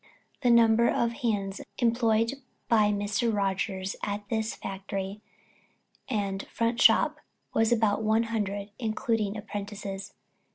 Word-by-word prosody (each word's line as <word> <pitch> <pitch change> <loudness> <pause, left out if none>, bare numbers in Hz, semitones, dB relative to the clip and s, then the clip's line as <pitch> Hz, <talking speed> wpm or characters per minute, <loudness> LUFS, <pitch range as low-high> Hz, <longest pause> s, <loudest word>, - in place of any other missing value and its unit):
The 250 - +3
number 235 0 +5
of 235 - +1
hands 205 -5 -2 0.2
employed 230 -1 +2 0.3
by 215 -3 +4
Mr. 205 +3 0
Rogers 195 -1 -1
at 205 0 -3
his 220 0 -1
factory 195 +1 -5 0.9
and 200 -4 -2
"front 230 +1 -1
shop" - - +5 0.4
was 225 +1 +2
about 220 -3 +2
one 220 +1 +3
hundred, 205 -3 -3
including 220 -2 -1
apprentices. 200 -1 -6
215 Hz, 115 wpm, -28 LUFS, 200-230 Hz, 0.9 s, number